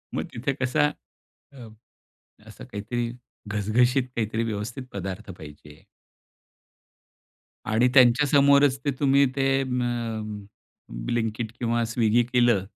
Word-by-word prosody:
मग -, -, -1 dB
तिथे 135 Hz, +4 st, -2 dB
कसा? 145 Hz, +3 st, +2 dB, 0.7 s
अ, 125 Hz, -4 st, -11 dB, 0.8 s
असं -, -, -11 dB
काहीतरी 115 Hz, +3 st, -4 dB, 0.4 s
घसघशीत 115 Hz, +6 st, +1 dB
काहीतरी 115 Hz, 0 st, -1 dB
व्यवस्थित 115 Hz, +4 st, -4 dB
पदार्थ 95 Hz, +1 st, -6 dB
पाहिजे. 75 Hz, -2 st, -13 dB, 1.8 s
आणि 115 Hz, +4 st, +2 dB
त्यांच्या 130 Hz, +2 st, +5 dB
समोरच 140 Hz, -1 st, +4 dB
ते 145 Hz, -, +2 dB
तुम्ही 140 Hz, 0 st, +4 dB
ते 135 Hz, 0 st, +1 dB
म, 115 Hz, -4 st, -3 dB, 0.6 s
ब्लिंकिट 115 Hz, -, -2 dB
किंवा 120 Hz, -1 st, 0 dB
स्विगी 120 Hz, 0 st, +2 dB
केलं 120 Hz, -5 st, +2 dB
120 Hz, 105 wpm, -25 LUFS, 110-130 Hz, 1.8 s, त्यांच्या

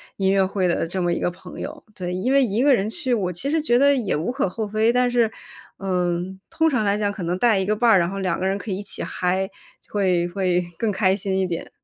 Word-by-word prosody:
音 190 Hz, -1 st, +1 dB
乐 195 Hz, -1 st, +4 dB
会 185 Hz, -2 st, 0 dB
的 165 Hz, -, 0 dB
这 185 Hz, +2 st, -3 dB
么 175 Hz, -1 st, +1 dB
一 -, -, -1 dB
个 -, -, 0 dB
朋 180 Hz, +1 st, -11 dB
友。 -, -, -7 dB
对。 180 Hz, -2 st, -4 dB
因 190 Hz, +9 st, -1 dB
为 275 Hz, -, +5 dB
一 230 Hz, -1 st, +1 dB
个 285 Hz, -1 st, +6 dB
人 205 Hz, -2 st, +1 dB
去， 260 Hz, 0 st, -2 dB
我 200 Hz, -6 st, 0 dB
其 270 Hz, -, -2 dB
实 320 Hz, 0 st, +2 dB
觉 240 Hz, -5 st, +2 dB
得 280 Hz, +2 st, +5 dB
也 245 Hz, -6 st, 0 dB
无 160 Hz, +11 st, -1 dB
可 260 Hz, -6 st, 0 dB
厚 220 Hz, +4 st, -3 dB
非， 215 Hz, +3 st, +1 dB
但 250 Hz, 0 st, +2 dB
是 235 Hz, -2 st, +3 dB, 0.5 s
嗯， 180 Hz, 0 st, -1 dB
通 320 Hz, -1 st, +2 dB
常 235 Hz, -7 st, 0 dB
来 200 Hz, +1 st, +2 dB
讲 205 Hz, -1 st, 0 dB
可 190 Hz, -3 st, -6 dB
能 175 Hz, +2 st, -1 dB
带 220 Hz, -2 st, +3 dB
一 190 Hz, -, 0 dB
个 210 Hz, +2 st, +1 dB
伴 230 Hz, +2 st, +3 dB
儿， 190 Hz, -, +6 dB
然 170 Hz, +1 st, +1 dB
后 195 Hz, 0 st, -5 dB
两 185 Hz, -3 st, -1 dB
个 190 Hz, -, 0 dB
人 195 Hz, +1 st, 0 dB
可 205 Hz, 0 st, -6 dB
以 185 Hz, -, -1 dB
一 200 Hz, -, -5 dB
起 -, -, -4 dB
嗨， 185 Hz, +2 st, -1 dB, 0.4 s
会 185 Hz, -4 st, +1 dB
会 180 Hz, -1 st, +1 dB, 0.2 s
更 225 Hz, -, +1 dB
开 190 Hz, -1 st, +2 dB
心 195 Hz, -1 st, -1 dB
一 190 Hz, -, +1 dB
点。 170 Hz, -2 st, -4 dB
195 Hz, 295 characters per minute, -23 LUFS, 185-230 Hz, 0.5 s, 个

